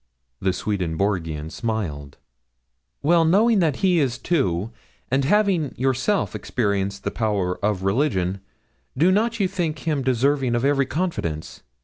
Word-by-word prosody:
The 95 - +1
Swedenborgian 85 -4 -2
smiled. 85 - -4 0.9
'Well, 165 +3 +4
knowing 205 +7 +4
that 160 -6 +2
he 180 -3 +4
is 130 -5 +1
so - - -11
too, 105 - 0 0.4
and 135 +1 +2
having 190 -4 +2
yourself 135 +10 0
experienced 100 -4 -2
the - - -2
power 100 -5 -1
of 100 -3 0
religion, 95 -4 0 0.6
do 170 +7 +4
not 225 +4 +1
you 195 - +3
think 175 -4 -2
him 150 -4 -1
deserving 130 0 +1
of 120 +2 0
every 140 -1 +2
confidence? 130 - -3
130 Hz, 135 wpm, -23 LUFS, 95-165 Hz, 0.9 s, Well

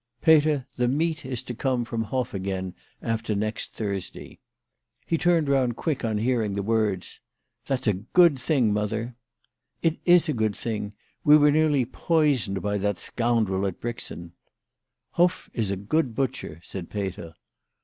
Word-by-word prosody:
" 120 - -48
Peter, 150 -4 +4
the 125 -1 +2
meat 160 +5 0
is 125 -3 -4
to 120 - -5
come 125 0 -1
from 115 -1 -3
Hoff 130 +3 -2
again 95 -1 -3 0.3
after 115 -1 -1
next 110 +2 -3
Thursday." 100 -4 -5 0.7
He 165 - 0
turned 170 -2 +2
round 130 -4 +2
quick 150 0 -2
on 110 -2 0
hearing 110 -3 0
the 100 - -2
words. 105 -4 -1 0.2
" - - -52
That's 135 -1 -1
a 105 - +3
good 135 - +3
thing, 125 -6 +2
mother." 110 +3 -2 0.3
" - - -53
It 165 -1 +1
is 175 -1 +5
a 155 - +1
good 110 -4 0
thing. 105 -3 -3 0.3
We 150 +1 +8
were 150 0 +5
nearly 150 -4 +3
poisoned 130 - +1
by 105 0 0
that 100 -1 0
scoundrel 115 -5 0
at 95 - -5
Brixen." 100 -7 -6 0.4
" - - -57
Hoff 175 +1 +2
is 110 -5 -1
a 100 - 0
good 115 +6 -1
butcher," 125 - -3
said 90 -4 -7
Peter. 95 -5 -5
115 Hz, 170 wpm, -25 LUFS, 105-145 Hz, 0.7 s, We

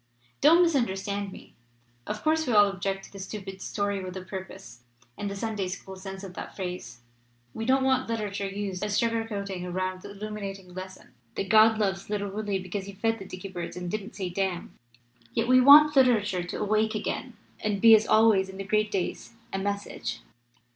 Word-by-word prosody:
Don't 330 +5 +7
misunderstand 205 - 0
me. - - -13 0.5
Of 210 0 -4
course, 315 0 +2
we 245 - +1
all 205 -1 +8
ob 195 -2 -4
ject 195 0 -2
to - - -13
the 195 - -10
stupid 195 -1 -7
'story 200 -2 -2
with 185 0 -6
a 185 - -6
purpose' 185 -10 -9 0.3
in 205 - -4
the 200 - -4
Sunday 210 -2 -2
school 190 +1 -7
sense 190 0 -8
of 190 -2 -8
that - - -8
phrase. 180 -10 -6 0.5
We 225 - -4
don't 265 +2 +3
want 260 -2 +2
literature 205 -3 -2
used 195 -1 -4
as 210 -1 -1
a - - +3
sugar 230 0 +1
coating 200 -4 -4
around 185 +1 -3
the - - -9
illuminating 200 -2 -7
lesson 185 +1 -9 0.3
that 195 - -3
God 220 +1 +6
loves 195 -2 -1
little 205 -1 -2
Willie 205 -1 -2
because 190 +1 -5
he 200 - -7
fed 225 +3 -1
the 195 - -8
dicky 185 +1 -8
birds 175 -2 -6
and 180 -1 -4
didn't 215 0 -4
sayj 185 -2 -4
'damn'! 190 -2 -2 0.6
Yet - - +1
we 255 0 +6
want 295 +3 +9
literature 215 -8 +4
to 175 - -5
awake 215 +1 +1
again! 210 - -4 0.2
and 210 -2 -1
be 225 +2 +8
as 220 0 +5
always 215 -3 +4
in 190 - -9
the 195 - -4
great 215 +2 +1
days 195 +3 -3 0.2
a 195 - -1
message.' 195 - -4
200 Hz, 200 wpm, -27 LUFS, 190-215 Hz, 0.6 s, want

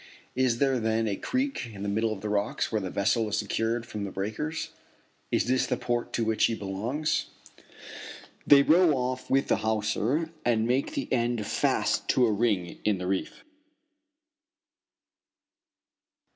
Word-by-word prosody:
Is 130 -2 +2
there 135 -1 +2
then 110 0 0
a 100 - -1
creek 260 - -2
in 100 -2 -8
the - - -2
middle 110 +2 0
of 100 -3 -5
the 105 - -3
rocks 105 0 -1
where 110 -2 0
the 95 - -4
vessel 105 +4 +1
is 105 - -1
secure 115 +3 -1
from 105 -3 -6
the 100 - -3
breakers? 110 +12 -4 0.6
Is - - +2
this 130 +1 +1
the - - 0
port 120 -1 -2
to 115 - 0
which 110 0 -1
she 115 - +3
belongs? 110 +10 -2 1.2
They 140 -1 +8
row 165 +1 +5
off 130 0 -3
with 135 +1 +2
the - - +2
hawser 110 +8 0
and 115 -2 +2
make 130 - 0
the 280 - -2
end 120 -3 0
fast - - 0
to 125 - +4
a 115 - +2
ring 105 -5 0
in 105 -2 +2
the 90 - -5
reef. 95 +1 -3
115 Hz, 160 wpm, -27 LUFS, 105-130 Hz, 1.2 s, They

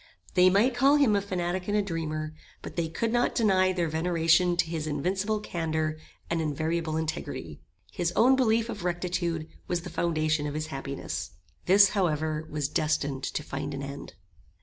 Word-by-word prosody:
They 185 0 +6
might 210 +7 +3
call 270 +4 +4
him 275 -8 +4
a 200 - +2
fanatic 180 -2 -2
and 205 0 +1
a - - +3
dreamer, 155 -4 -3 0.3
but - - -8
they 170 -2 0
could 225 +8 -1
not 240 0 +2
deny 190 -4 +3
their 175 -2 0
veneration 165 +2 +2
to 175 - +3
his 160 -1 -4
invincible 190 +8 -1
candour 160 -4 -2 0.3
and 165 -1 -1
invariable 160 +1 -1
integrity. 120 - -4 0.3
His 175 -1 -1
own 255 +4 +6
belief 230 -3 +2
of 215 -5 -6
rectitude 175 -2 -2 0.2
was 175 -1 -1
the 175 -1 -8
foundation 155 -3 0
of 145 - -5
his 155 0 -2
happiness. 135 - -5 0.3
This, 200 +2 +7
however, 155 -5 -1
was 150 -2 -1
destined 145 -3 -1
to 150 - -3
find 140 0 -4
an 140 - -5
end. 140 -7 -8
170 Hz, 170 wpm, -28 LUFS, 155-190 Hz, 0.3 s, This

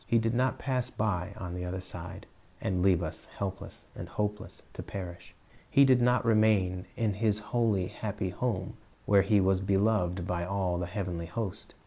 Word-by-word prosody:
lie 115 - +6
did 115 0 +1
nut 130 +2 +2
pass 130 -2 -1
us - - -15
by 100 -3 0
on 90 -4 -5
the 90 0 -4
other 90 +1 -3
side, 90 -1 -7 0.3
and 90 -2 0
leave 95 -2 +4
us, - - -5
helpless 95 -1 -5
and - - -7
hopeless, 105 0 -3
to - - -6
perish. 90 -2 -7 0.3
He 140 - +6
did 130 -2 +5
not 125 0 +3
remain 105 -5 +3
in 110 -3 +1
His 105 +1 +1
holy, 105 -3 +1
happy 95 0 -3
home, 120 +5 -2 0.3
where 100 -1 +6
He 100 +2 +4
was 95 0 +3
beloved 95 -2 +2
by 90 -1 -1
all 90 -1 0
the 90 - -2
heavenly 90 -3 -3
host. 95 +2 -5
100 Hz, 180 wpm, -30 LUFS, 90-110 Hz, 0.3 s, lie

